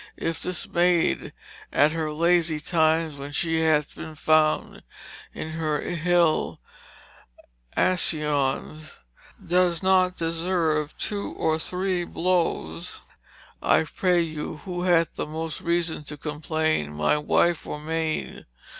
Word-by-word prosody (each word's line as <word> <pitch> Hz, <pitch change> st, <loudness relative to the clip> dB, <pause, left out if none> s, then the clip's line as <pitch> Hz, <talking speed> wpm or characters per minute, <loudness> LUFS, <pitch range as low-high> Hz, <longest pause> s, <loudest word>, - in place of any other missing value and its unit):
Yf 165 Hz, -1 st, -2 dB
this 180 Hz, -1 st, -3 dB
maide 175 Hz, -1 st, +2 dB, 0.4 s
at 145 Hz, +2 st, +4 dB
her 160 Hz, -1 st, -2 dB
lazy 170 Hz, 0 st, +2 dB
tymes 160 Hz, -1 st, +1 dB
when 140 Hz, +1 st, -7 dB
she 165 Hz, +2 st, +1 dB
hath 155 Hz, -2 st, +2 dB
bin 160 Hz, -, -8 dB
found 155 Hz, 0 st, +2 dB, 0.5 s
in 155 Hz, -, -6 dB
her 155 Hz, -2 st, -1 dB
yll 175 Hz, -1 st, +1 dB, 1.2 s
accyons 150 Hz, -3 st, 0 dB, 0.5 s
doe 180 Hz, 0 st, +3 dB
not 185 Hz, -1 st, +3 dB
disserve 165 Hz, -2 st, -1 dB
2 205 Hz, -2 st, -2 dB
or 160 Hz, 0 st, 0 dB
3 180 Hz, +1 st, -1 dB
blowes 165 Hz, -, -1 dB, 0.6 s
I -, -, +4 dB
pray 175 Hz, +2 st, +1 dB
you 155 Hz, -2 st, -5 dB
who 175 Hz, -1 st, -4 dB
hath 175 Hz, -2 st, +3 dB
the -, -, -4 dB
most 160 Hz, +1 st, -5 dB
reason 170 Hz, -2 st, -1 dB
to 150 Hz, +1 st, -7 dB
complain 155 Hz, -, -1 dB
my 75 Hz, -, +2 dB
Wyfe 170 Hz, +2 st, +1 dB
or 150 Hz, -, -4 dB
maide. 160 Hz, +1 st, -3 dB
160 Hz, 120 wpm, -25 LUFS, 155-175 Hz, 1.2 s, at